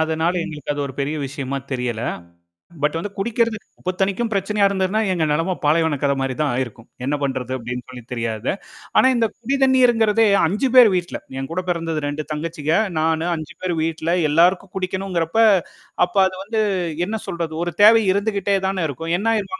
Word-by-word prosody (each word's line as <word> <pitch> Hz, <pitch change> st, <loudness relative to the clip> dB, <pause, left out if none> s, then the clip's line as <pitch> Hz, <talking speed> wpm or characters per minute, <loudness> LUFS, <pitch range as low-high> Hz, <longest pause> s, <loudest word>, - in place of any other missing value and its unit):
அதனால 160 Hz, +2 st, +1 dB
எங்களுக்கு 150 Hz, -3 st, -4 dB
அது 145 Hz, -, -4 dB
ஒரு 135 Hz, -, -7 dB
பெரிய 145 Hz, +3 st, -1 dB
விஷயமா 140 Hz, 0 st, -4 dB
தெரியல. 125 Hz, -3 st, -2 dB, 0.8 s
பட் 150 Hz, +2 st, +1 dB, 0.2 s
குடிக்கிறதுக்கு 230 Hz, +1 st, -1 dB
உப்பு 185 Hz, -, -2 dB
தண்ணீக்கும், 200 Hz, +4 st, 0 dB
பிரச்சனையா 200 Hz, +1 st, +2 dB
இருந்திருந்தா, 195 Hz, +2 st, 0 dB
எங்க 165 Hz, -3 st, +1 dB
நெலம 165 Hz, +4 st, 0 dB
பாலைவன 155 Hz, -1 st, +2 dB
கத 140 Hz, -1 st, +2 dB
மாரி 135 Hz, -1 st, -1 dB
தான் 145 Hz, -4 st, +1 dB
ஆயிருக்கும். 120 Hz, -2 st, -4 dB, 0.2 s
"என்ன 140 Hz, -, 0 dB
பண்றது?" 130 Hz, -2 st, -2 dB
அப்படின்னு 125 Hz, +1 st, -5 dB
சொல்லி 125 Hz, -2 st, -9 dB
தெரியாது. 115 Hz, -1 st, -2 dB, 0.4 s
ஆனா -, -, +6 dB
இந்தக் 225 Hz, -2 st, 0 dB
குடிதண்ணீர்ங்கறதே 240 Hz, -4 st, +3 dB, 0.2 s
5 210 Hz, +10 st, 0 dB
பேர் 240 Hz, -5 st, +9 dB
வீட்டுல 175 Hz, 0 st, -3 dB, 0.2 s
என் 135 Hz, -, -5 dB
கூடப் 185 Hz, +1 st, -3 dB
பிறந்தது. 165 Hz, -2 st, -1 dB
2 145 Hz, +1 st, -4 dB
தங்கச்சிக, 155 Hz, 0 st, -3 dB, 0.3 s
நானு. 160 Hz, +1 st, +1 dB
5 160 Hz, +1 st, -7 dB
பேர் 180 Hz, -2 st, -1 dB
வீட்டுல. 165 Hz, 0 st, -2 dB, 0.2 s
எல்லாருக்கும் 180 Hz, +4 st, +3 dB
குடிக்கனும்ங்கிறப்ப 185 Hz, -1 st, -2 dB, 0.7 s
அப்ப 180 Hz, -, -15 dB
அது 185 Hz, -, -2 dB
வந்து 220 Hz, +2 st, -1 dB, 0.5 s
என்ன 220 Hz, +2 st, -2 dB
சொல்றது? 170 Hz, -2 st, -3 dB
ஒரு 175 Hz, -, -3 dB
தேவை 225 Hz, +1 st, +8 dB
இருந்துகிட்டே 200 Hz, -1 st, 0 dB
தானே 190 Hz, -3 st, -1 dB
இருக்கும்? 165 Hz, +5 st, -4 dB
என்ன 215 Hz, -, -4 dB
ஆயிருமா 220 Hz, -, -3 dB
170 Hz, 165 wpm, -21 LUFS, 145-200 Hz, 0.8 s, பேர்